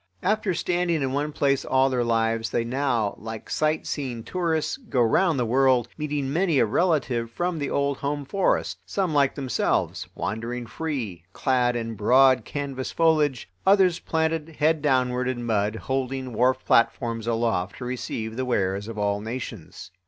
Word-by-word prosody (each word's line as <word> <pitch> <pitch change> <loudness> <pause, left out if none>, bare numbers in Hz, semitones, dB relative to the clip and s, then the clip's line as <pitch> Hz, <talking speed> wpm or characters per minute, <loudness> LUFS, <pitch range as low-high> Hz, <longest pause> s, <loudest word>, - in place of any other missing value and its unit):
After 200 -1 +1
standing 175 -3 0
in 130 - -1
one 145 +2 -1
place 140 -2 +1
all 130 0 +3
their 125 -2 +1
lives 115 -1 0
they 120 - 0
now, 120 -4 0
like 110 +1 -8
sight 155 0 0
seeing 125 -6 -4
tourists, 165 - -1
go 225 - -3
round 150 +8 +3
the 125 - +1
world, 125 0 +3
meeting 145 -3 -2
many 170 -2 +2
a - - +5
relative 130 - +1
from 175 +6 -2
the 140 - -2
old 140 -1 0
home 145 0 -3
forest, 195 +6 0
some 185 -5 -1
like 140 -2 +3
themselves, 130 -5 -1
wandering 120 +3 -3
free, 115 - -4
clad 125 -2 +1
in 115 -1 -3
broad 125 +3 +4
canvas 140 -3 -4
foliage, 155 -6 +2 0.2
others 190 -3 +4
planted 160 -1 -1
head 155 0 +2
downward 125 -3 +1
in 125 -2 -2
mud, 105 -2 0
holding 130 +1 -3
wharf 130 +3 +1
platforms 115 -1 +2
aloft 115 -5 0
to 125 - -6
receive 115 -2 -4
the 130 - -1
wares 100 -4 0
of 115 -1 -7
all 100 0 0
nations. 110 -7 -7
130 Hz, 160 wpm, -25 LUFS, 115-150 Hz, 0.2 s, a